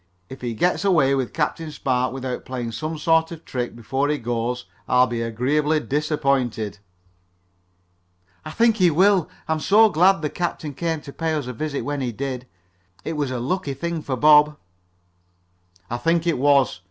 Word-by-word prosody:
If 130 - -10
he 120 -2 -3
gets 180 - +1
away 155 -9 +3
with 130 -3 -1
Captain 160 0 -2
Spark 130 -3 -1
without 130 -1 -5
playing 125 -3 -5
some 155 +6 -4
sort 165 +1 +2
of 170 - -6
a - - -38
trick 125 -2 -4
before 135 +5 -1
he 150 - +1
goes 120 0 -3 0.2
I'll 125 0 +5
be 120 -2 -3
agreeably 140 +7 +1
disappointed." 135 -8 -1 1.6
"I - - -7
think 225 +6 +2
he 180 -2 +5
will. 185 +2 +3 0.2
I'm 160 0 0
so 215 +7 +5
glad 180 0 +3
the 150 - 0
captain 165 -4 -3
came 160 +1 -2
to 140 - -10
pay 160 -1 -1
us 150 -4 -2
a 125 - -5
visit 140 +3 -3
when 145 -1 -2
he 125 -2 -2
did. 130 +1 -5 0.6
It 160 - -2
was 145 -3 -2
a 125 -1 -3
lucky 140 +2 -2
thing 170 +3 -3
for 135 -3 -3
Bob." 150 +2 +5 1.3
"I 120 - -3
think 165 +6 +1
it 170 -6 +1
was. 140 -6 +3
145 Hz, 175 wpm, -22 LUFS, 125-160 Hz, 1.6 s, I'll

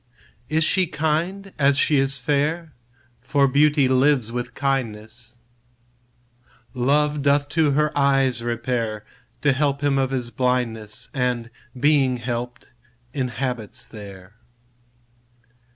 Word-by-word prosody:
Is 160 +2 +2
she 185 +3 +2
kind 165 +6 -2
as 140 -1 +4
she 145 0 +3
is 135 0 +1
fair? 150 +4 -1 0.5
For 140 -2 +2
beauty 145 +1 +3
lives 130 -2 +3
with 120 +1 -5
kindness: 120 -3 -3 1.4
Love 145 +4 +1
doth 145 +1 +2
to 155 -3 +2
her 150 +1 +1
eyes 135 -3 +2
repair, 115 -2 -2 0.4
To 145 -2 +4
help 140 0 0
him 140 -2 +2
of 135 -1 +1
his 125 -3 -3
blindness; 125 -1 -2
And, 125 -3 -1 0.3
being 135 -2 +3
help'd, 120 +1 -5 0.4
inhabits 125 -4 -3
there. 100 -3 -11
135 Hz, 110 wpm, -23 LUFS, 120-145 Hz, 1.4 s, as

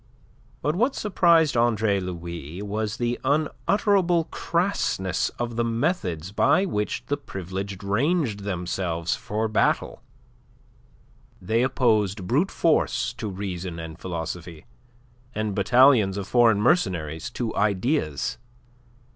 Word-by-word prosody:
But 150 +2 +1
what 245 +8 +1
surprised 170 - +3
Andre 110 -4 +2
Louis 85 -1 -6
was 105 +1 -3
the 120 0 -1
unutterable 175 +5 +2
crassness 170 - 0
of 120 -1 -3
the 120 - +2
methods 115 - -1
by 185 - +3
which 105 - -2
the 145 - -1
Privileged 95 - -6
ranged 120 - 0
themselves 90 -3 -2
for 110 +2 -2
battle. 110 - 0 1.4
They 110 +5 0
opposed 110 -7 +1
brute 145 - +1
force 155 -6 +1
to 115 -2 -5
reason 95 -3 -5
and 80 0 -8
philosophy, 85 -2 -6 0.7
and 110 -1 -1
battalions 110 -1 +4
of 100 -1 -4
foreign 115 -4 +4
mercenaries 85 - +1
to 115 -3 -2
ideas. 105 - 0
105 Hz, 110 wpm, -25 LUFS, 95-135 Hz, 1.4 s, battalions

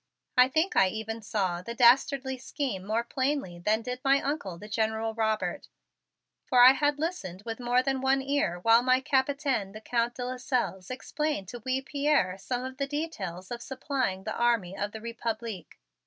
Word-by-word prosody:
I 250 0 +7
think 315 +8 0
I 195 - +6
even 220 +3 -4
saw 190 -5 -1
the 235 +6 -7
dastardly 265 +2 +4
scheme 255 -8 -3
more 225 +2 +1
plainly 260 -8 -2
than 215 +5 +1
did 250 +1 -4
my 275 +1 +4
Uncle, 275 - -3
the 210 - -10
General 220 +1 -1
Robert, 220 -1 -1 0.8
for 250 - +2
I 255 - +11
had 290 0 +1
listened 210 - -4
with 225 0 -5
more 245 +1 +2
than 270 -1 -1
one 270 +1 +3
ear 275 -10 0
while 230 +4 +6
my 255 +1 +3
Capitaine, 265 -6 0
the 215 - -9
Count 235 +1 0
de 245 - -4
Lasselles, 250 -7 -2
explained 275 - -3
to 240 - -7
wee 260 +1 0
Pierre 280 -10 +1
some 245 +5 -3
of 260 0 -6
the 275 0 -1
details 205 - -5
of 240 0 -4
supplying 260 -8 -2
the - - -3
army 230 -6 +1
of 205 +1 -3
the 220 - -8
Republique. 230 -4 -5
240 Hz, 180 wpm, -28 LUFS, 215-270 Hz, 0.8 s, I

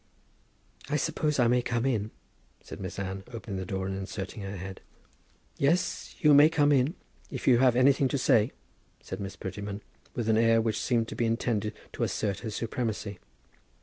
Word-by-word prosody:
"I 150 - +1
suppose 150 0 0
I 125 - +4
may 125 +1 +3
come 120 0 -1
in?" 110 -5 0 0.5
said - - -9
Miss 95 -2 -6
Anne, 95 0 -4
opening 115 -4 -6
the 95 -1 -4
door 95 0 -2
and 95 0 -3
inserting 95 +2 -5
her 100 0 -5
head. 95 +1 -7 0.8
"Yes, 160 +6 0
you 150 -3 +6
may 145 +2 +8
come 150 -3 +3
in, 140 +5 +3 0.3
if - - -6
you 120 -3 +6
have 125 -2 +5
anything 135 +2 +4
to 140 - -1
say," 115 -2 +3 0.5
said - - -6
Miss 95 0 -5
Prettyman, 100 +1 -6 0.3
with 120 -2 -2
an 110 0 +4
air 115 0 +5
which 110 -1 0
seemed 115 -3 +1
to - - -6
be 120 - +1
intended 115 -2 -1 0.2
to - - -6
assert 100 -3 -1
her 110 - -5
supremacy. 110 -3 -3
115 Hz, 180 wpm, -29 LUFS, 100-130 Hz, 0.8 s, may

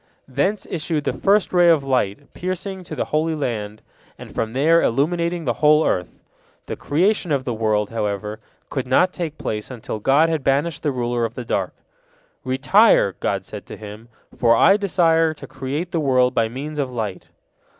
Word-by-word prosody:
Thence 145 +11 -1
issued 155 -2 -2
the - - -1
first 200 0 +2
ray 175 -1 +5
of 160 -4 +4
light, 130 -2 -1
piercing 185 +1 -4
to 155 - -7
the - - -2
Holy 160 +1 +1
Land, 110 -7 -4 0.3
and - - -11
from 110 0 -2
there 160 +6 +4
illuminating 170 +6 0
the 120 - +1
whole 150 +1 +5
earth. 90 -2 0 0.6
The - - -5
creation 180 +4 0
of 140 -2 +1
the 125 - -3
world, 110 -2 0
however, 105 -1 -3 0.3
could 130 -3 -3
not 180 +8 +3
take 160 -4 -4
place 105 -1 -4
until 115 -3 -6
God 140 +8 +4
had 160 -4 -1
banished 140 +4 0
the 150 - 0
ruler 120 -2 -1
of 115 0 -3
the 125 - -6
dark. - - -2 0.7
"Retire," 130 - +4
God 95 -2 -2
said 105 +1 -9
to - - -9
him, 105 +2 -10 0.3
"for 115 -1 +4
I 195 +11 +6
desire 165 -5 +2
to - - -10
create 145 +7 -4
the 170 - 0
world 130 -3 +2
by 115 -2 +1
means 145 +5 -6
of 135 -2 -1
light." 110 -6 -4
140 Hz, 180 wpm, -21 LUFS, 115-165 Hz, 0.7 s, I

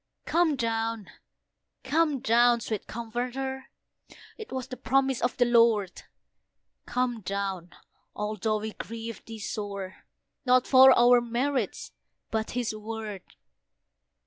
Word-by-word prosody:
Come 335 -3 +2
down! 225 -3 -2 0.7
come 295 -1 +1
down! 240 -1 +4
sweet 215 -3 -4
Comforter! 250 +4 -4 0.7
It 440 -2 -10
was 260 -2 -4
the 255 - -7
promise 265 +1 +1
of 245 - -1
the 245 - +4
Lord. 230 -5 +3 0.9
Come 250 -2 -1
down! 195 -2 -4 0.4
although 215 +1 -1
we 215 0 -5
grieve 230 -1 -7
Thee 225 -1 -8
sore, 200 -3 -6 0.4
Not 255 -1 +4
for 265 0 +8
our 245 0 +6
merits 240 0 -2 0.4
but 220 0 -1
His 240 -3 -1
Word. 215 -2 -6
235 Hz, 115 wpm, -27 LUFS, 215-255 Hz, 0.9 s, for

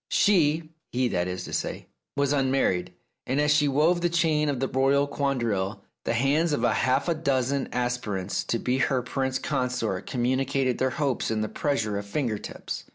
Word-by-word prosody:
She 160 -5 +3
— - - -55
he, 125 +1 +1
that 90 -3 0
is 90 0 -4
to - - -8
say— - - -3 0.3
was 140 0 +1
unmarried, 135 -10 +1 0.4
and 130 +3 0
as 150 0 +4
she 150 0 +3
wove 155 +6 +3
the 175 - +2
chain 155 -3 +2
of 140 -3 -1
the 135 - 0
royal 135 +2 +2
quadrille, 120 -9 -1 0.2
the 115 - 0
hands 145 +6 +2
of - - 0
half 130 +4 +2
a 170 - +3
dozen 140 -3 0
aspirants 120 -6 -2
to 115 - 0
be 125 +3 0
her 130 -2 +1
prince 130 +1 -1
consort 125 -9 -2
com 125 -2 -1
municated 130 0 +1
their 130 - +2
hopes 135 0 -1
in 110 -1 0
the 110 - -2
pressure 110 -8 -1
of 100 - -8
finger 110 -1 -1
tips. - - -6
130 Hz, 190 wpm, -26 LUFS, 120-145 Hz, 0.4 s, as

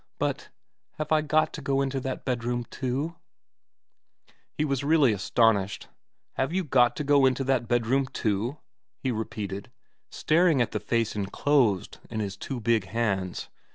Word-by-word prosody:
But - - -2 0.4
have 155 0 -5
I 155 -1 +4
got 155 +1 +1
to 150 - -6
go 135 -1 0
into 135 0 -2
that 130 0 -5
bedroom 120 -1 -1
too? 140 +6 -3 0.7
' - - -37
He 150 - +1
was 140 -2 -1
really 145 -5 +4
astonished. 105 0 +1 0.2
' - - -55
Have 135 +3 0
you 190 +2 0
got 125 -5 +3
to 150 - -3
go 140 -1 +5
into 130 +1 0
that 130 -3 +1
bedroom 120 +3 +1
too? 115 +4 -1 0.2
' - - -59
he 130 - +1
repeated, 105 -3 -4 0.4
staring 165 -2 +3
at 120 - +1
the 105 - -2
face 115 -1 -1
enclosed 105 0 +1
in 110 - -4
his 100 -3 -3
two 125 +6 -5
big 115 -3 +1
hands. 100 -3 -2
125 Hz, 165 wpm, -27 LUFS, 110-140 Hz, 0.7 s, go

